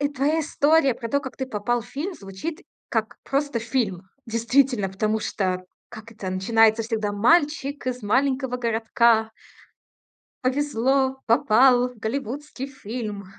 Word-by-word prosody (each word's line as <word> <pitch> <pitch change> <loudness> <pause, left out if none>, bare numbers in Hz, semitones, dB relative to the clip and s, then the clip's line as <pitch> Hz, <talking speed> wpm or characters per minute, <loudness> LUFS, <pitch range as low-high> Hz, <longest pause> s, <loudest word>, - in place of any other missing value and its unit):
твоя 295 +4 +1
история 295 -2 +3
про 230 - -6
то, 280 - +2
как 265 -2 -8
ты 265 - -2
попал 235 +1 -1
в 235 - -14
фильм, 340 +8 -4
звучит 245 - -7 0.3
как 220 -3 -2
просто 280 -2 -1
фильм. 220 -7 -2 0.2
Действительно, 235 -2 +2
потому 215 +3 -1
что 185 -3 -2 0.2
как 220 0 -11
это 195 -4 -6
начинается 220 +4 +3
всегда: 220 -2 -2
"Мальчик 285 +3 +2
из 250 -3 -3
маленького 260 +2 +1
городка. 225 -1 +2 1.1
Повезло, 265 0 +1
попал 250 0 +4
в 250 - -15
голливудский 270 +4 -4
фильм". 215 -6 -6
240 Hz, 130 wpm, -24 LUFS, 220-275 Hz, 1.1 s, попал